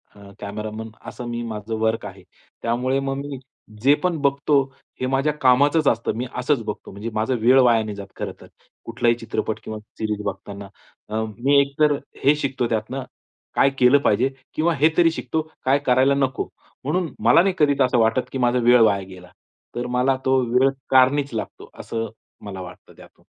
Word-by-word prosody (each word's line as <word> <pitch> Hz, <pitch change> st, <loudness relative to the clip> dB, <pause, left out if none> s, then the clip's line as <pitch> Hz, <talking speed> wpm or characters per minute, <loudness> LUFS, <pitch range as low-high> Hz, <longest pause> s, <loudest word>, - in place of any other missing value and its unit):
अ, 100 Hz, -1 st, -14 dB
cameraman 110 Hz, +2 st, -6 dB, 0.2 s
असं 125 Hz, -, -7 dB
मी 120 Hz, 0 st, -3 dB
माझं 110 Hz, +1 st, -5 dB
work 110 Hz, 0 st, 0 dB
आहे. -, -, -10 dB, 0.4 s
त्यामुळे 125 Hz, +3 st, 0 dB
मग 135 Hz, 0 st, -2 dB
मी 140 Hz, -1 st, -6 dB, 0.4 s
जे 140 Hz, +3 st, +5 dB
पण 180 Hz, -2 st, +1 dB
बघतो 140 Hz, +1 st, +1 dB, 0.5 s
हे -, -, +1 dB
माझ्या 135 Hz, +3 st, +1 dB
कामाचंच 140 Hz, +4 st, +4 dB
असतं. 115 Hz, -2 st, +1 dB
मी 125 Hz, -, -2 dB
असंच 125 Hz, -1 st, 0 dB
बघतो. 105 Hz, -, -6 dB
म्हणजे 105 Hz, +4 st, -6 dB
माझा 110 Hz, +4 st, 0 dB
वेळ 130 Hz, +3 st, +6 dB
वाया 120 Hz, -3 st, +4 dB
नाही 105 Hz, -2 st, -6 dB
जात 100 Hz, -1 st, -8 dB
खरंतर. -, -, -7 dB, 0.4 s
कुठलाही 115 Hz, 0 st, +1 dB
चित्रपट 110 Hz, -1 st, -3 dB
किंवा 110 Hz, 0 st, -6 dB, 0.2 s
सीरीज 105 Hz, -1 st, -2 dB
बघताना 100 Hz, 0 st, -6 dB, 0.4 s
अ, 110 Hz, +1 st, -1 dB, 0.2 s
मी 140 Hz, +4 st, +4 dB
एकतर 145 Hz, +2 st, +2 dB, 0.3 s
हे 145 Hz, +2 st, +5 dB
शिकतो, 135 Hz, -4 st, -2 dB
त्यातनं 115 Hz, +4 st, -2 dB, 0.5 s
काय 135 Hz, -, +5 dB
केलं 125 Hz, +2 st, +6 dB
पाहिजे? 120 Hz, +2 st, +2 dB, 0.2 s
किंवा 165 Hz, +2 st, +1 dB
हे 150 Hz, +4 st, +4 dB
तरी 165 Hz, -2 st, +5 dB
शिकतो, 160 Hz, -1 st, -2 dB, 0.2 s
काय 135 Hz, +2 st, +3 dB
करायला 130 Hz, +2 st, +4 dB
नको? 135 Hz, -1 st, -1 dB, 0.4 s
म्हणून 155 Hz, 0 st, -1 dB
मला 120 Hz, +9 st, +6 dB
नाही 195 Hz, 0 st, +1 dB
कधी 145 Hz, -2 st, +4 dB
तर -, -, +6 dB
असं 125 Hz, -1 st, +1 dB
वाटतं 115 Hz, +2 st, +3 dB
की -, -, -3 dB
माझा 125 Hz, 0 st, +2 dB
वेळ 120 Hz, 0 st, +5 dB
वाया 100 Hz, -3 st, +3 dB
गेला. 90 Hz, -1 st, -13 dB, 0.5 s
तर 120 Hz, +1 st, -3 dB
मला 125 Hz, +2 st, +1 dB
तो 130 Hz, 0 st, +3 dB
वेळ 130 Hz, +2 st, +4 dB, 0.2 s
कारणीच 135 Hz, +1 st, +3 dB
लागतो, 110 Hz, -, -6 dB
असं 115 Hz, -1 st, -4 dB, 0.4 s
मला 95 Hz, -2 st, -6 dB
वाटतं 90 Hz, -1 st, -12 dB
त्यातून. -, -, -18 dB
125 Hz, 180 wpm, -22 LUFS, 110-140 Hz, 0.5 s, वेळ